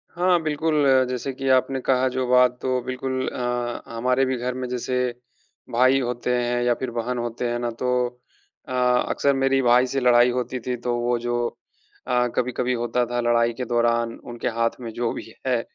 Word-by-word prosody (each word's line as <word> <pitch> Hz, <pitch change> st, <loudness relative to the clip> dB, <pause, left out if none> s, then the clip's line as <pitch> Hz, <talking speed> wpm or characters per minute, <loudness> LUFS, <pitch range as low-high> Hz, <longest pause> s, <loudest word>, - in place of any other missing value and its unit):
हाँ, 180 Hz, -1 st, +3 dB
बिल्कुल 155 Hz, -1 st, +1 dB
अ, 130 Hz, -1 st, +5 dB
जैसे 130 Hz, +2 st, -3 dB
कि 135 Hz, +1 st, -5 dB
आपने 130 Hz, +1 st, +2 dB
कहा 130 Hz, 0 st, +2 dB
जो 130 Hz, 0 st, -2 dB
बात 125 Hz, 0 st, +4 dB
तो 130 Hz, -1 st, 0 dB
बिल्कुल 130 Hz, 0 st, -3 dB
अ -, -, -5 dB
अ, 120 Hz, -1 st, -2 dB
हमारे 125 Hz, +3 st, +2 dB
भी 130 Hz, -1 st, -1 dB
घर 125 Hz, +1 st, -2 dB
में 130 Hz, 0 st, -4 dB
जैसे 125 Hz, +1 st, -3 dB, 0.8 s
भाई 130 Hz, +3 st, +4 dB
होते 125 Hz, 0 st, -2 dB
हैं 120 Hz, 0 st, 0 dB
या 120 Hz, 0 st, +3 dB
फिर 130 Hz, 0 st, -4 dB
बहन 120 Hz, +1 st, -2 dB
होते 120 Hz, +1 st, -3 dB
हैं 120 Hz, 0 st, -2 dB
ना 120 Hz, -, -1 dB
तो 125 Hz, 0 st, 0 dB, 0.8 s
अ, -, -, -8 dB
अक्सर 125 Hz, +2 st, +2 dB
मेरी 135 Hz, 0 st, +2 dB
भाई 125 Hz, +1 st, +5 dB
से 135 Hz, +2 st, -1 dB
लड़ाई 125 Hz, -1 st, +5 dB
होती 125 Hz, 0 st, -3 dB
थी 125 Hz, -, 0 dB
तो 120 Hz, -, +1 dB
वो 120 Hz, 0 st, +1 dB
जो 120 Hz, 0 st, -1 dB, 0.7 s
अ, 125 Hz, 0 st, +2 dB
कभी-कभी 125 Hz, 0 st, 0 dB
होता 120 Hz, +1 st, 0 dB
था 120 Hz, +1 st, -3 dB
लड़ाई 120 Hz, 0 st, +2 dB
के 125 Hz, +2 st, -4 dB
दौरान 115 Hz, 0 st, +1 dB
उनके 120 Hz, -1 st, -5 dB
हाथ 115 Hz, +2 st, 0 dB
में 115 Hz, -, -6 dB
जो 120 Hz, -1 st, -1 dB
भी 110 Hz, -, -8 dB
है। 125 Hz, -3 st, +2 dB
125 Hz, 200 wpm, -23 LUFS, 120-130 Hz, 0.8 s, अ